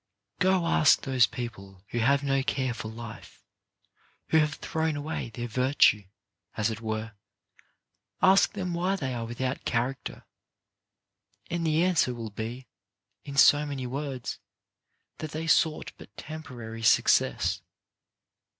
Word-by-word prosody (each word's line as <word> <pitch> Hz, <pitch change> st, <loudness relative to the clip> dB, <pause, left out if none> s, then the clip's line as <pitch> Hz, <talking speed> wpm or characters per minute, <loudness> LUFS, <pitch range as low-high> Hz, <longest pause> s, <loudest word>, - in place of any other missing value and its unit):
Go 185 Hz, -2 st, +3 dB
ask 155 Hz, -3 st, +4 dB
those 130 Hz, -4 st, +4 dB
people 100 Hz, -6 st, -8 dB
who 120 Hz, -, -2 dB
have 140 Hz, +5 st, +3 dB
no 135 Hz, -1 st, +1 dB
care 130 Hz, -2 st, -1 dB
for 110 Hz, -, -6 dB
life, 115 Hz, -2 st, -10 dB, 0.9 s
who 160 Hz, -, +4 dB
have 150 Hz, 0 st, +1 dB
thrown 160 Hz, -1 st, -2 dB
away 145 Hz, -4 st, -4 dB
their 120 Hz, +2 st, -5 dB
virtue, 125 Hz, -4 st, +3 dB, 0.5 s
as 105 Hz, +1 st, +1 dB
it 110 Hz, 0 st, -6 dB
were, 110 Hz, 0 st, -3 dB, 1.1 s
ask 195 Hz, +3 st, +5 dB
them 185 Hz, -4 st, -3 dB
why 180 Hz, +3 st, 0 dB
they 135 Hz, -8 st, -3 dB
are 115 Hz, -1 st, -3 dB
without 125 Hz, +3 st, -3 dB
character, 125 Hz, +3 st, -2 dB, 1.3 s
and 170 Hz, -1 st, -1 dB
the 160 Hz, +2 st, +3 dB
answer 170 Hz, -9 st, +2 dB
will 115 Hz, -2 st, -6 dB
be, 115 Hz, +5 st, -6 dB, 0.6 s
in 140 Hz, -1 st, -7 dB
so 145 Hz, +2 st, +7 dB
many 140 Hz, -3 st, -4 dB
words, 135 Hz, -1 st, -4 dB, 0.8 s
that 155 Hz, -1 st, -6 dB
they 160 Hz, +1 st, -3 dB
sought 160 Hz, -1 st, +2 dB
but 100 Hz, -, -15 dB
temporary 125 Hz, -8 st, -8 dB
success. 110 Hz, -, +3 dB
130 Hz, 130 wpm, -28 LUFS, 115-155 Hz, 1.3 s, so